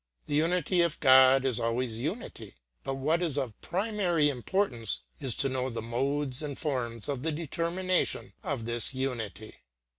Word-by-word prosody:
The -, -, -5 dB
unity 175 Hz, +3 st, +2 dB
of 170 Hz, -2 st, 0 dB
God 130 Hz, 0 st, +6 dB
is 125 Hz, -3 st, +2 dB
always 115 Hz, 0 st, -1 dB
unity, 135 Hz, -, -5 dB, 0.3 s
but 135 Hz, -, -3 dB
what 155 Hz, +6 st, 0 dB
is 160 Hz, -5 st, -1 dB
of 130 Hz, -7 st, -4 dB
primary 180 Hz, -5 st, +1 dB
importance 125 Hz, -, -1 dB, 0.2 s
is 130 Hz, -5 st, +2 dB
to 140 Hz, -, +2 dB
know 130 Hz, -1 st, -2 dB
the 115 Hz, -, -5 dB
modes 135 Hz, +3 st, -2 dB
and 145 Hz, -3 st, -5 dB
forms 120 Hz, -7 st, -2 dB
of 140 Hz, -3 st, -3 dB
the 160 Hz, +3 st, 0 dB
determination 170 Hz, +4 st, -1 dB
of 140 Hz, -, -4 dB
this 120 Hz, +2 st, +4 dB
unity. 115 Hz, -5 st, -4 dB
135 Hz, 155 wpm, -29 LUFS, 120-165 Hz, 0.3 s, God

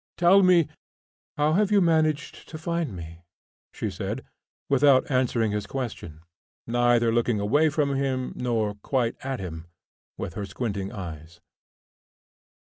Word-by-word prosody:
Tell 180 Hz, +3 st, +6 dB
me 180 Hz, -4 st, +5 dB, 0.3 s
" -, -, -78 dB
"How 150 Hz, +1 st, +2 dB
have 205 Hz, +3 st, +2 dB
you 205 Hz, -, +5 dB
managed 155 Hz, -4 st, +1 dB
to 160 Hz, -, -7 dB
find 170 Hz, -, -2 dB
me?" 85 Hz, -1 st, -9 dB, 0.5 s
she -, -, -4 dB
said, -, -, -5 dB, 0.4 s
without 140 Hz, 0 st, +4 dB
answering 120 Hz, -4 st, +1 dB
his 105 Hz, 0 st, -3 dB
question, 115 Hz, -, -6 dB, 0.4 s
neither 120 Hz, -1 st, +2 dB
looking 120 Hz, -2 st, +1 dB
away 145 Hz, +11 st, +3 dB
from 145 Hz, -2 st, 0 dB
him 135 Hz, -2 st, -1 dB
nor 115 Hz, -4 st, -1 dB
quite 115 Hz, +3 st, -1 dB
at 135 Hz, -1 st, -3 dB
him, 80 Hz, -3 st, -7 dB, 0.5 s
with 85 Hz, -, -5 dB
her 100 Hz, +2 st, -5 dB
squinting 100 Hz, -1 st, -3 dB
eyes. 85 Hz, -5 st, -8 dB
125 Hz, 140 wpm, -26 LUFS, 105-150 Hz, 0.5 s, Tell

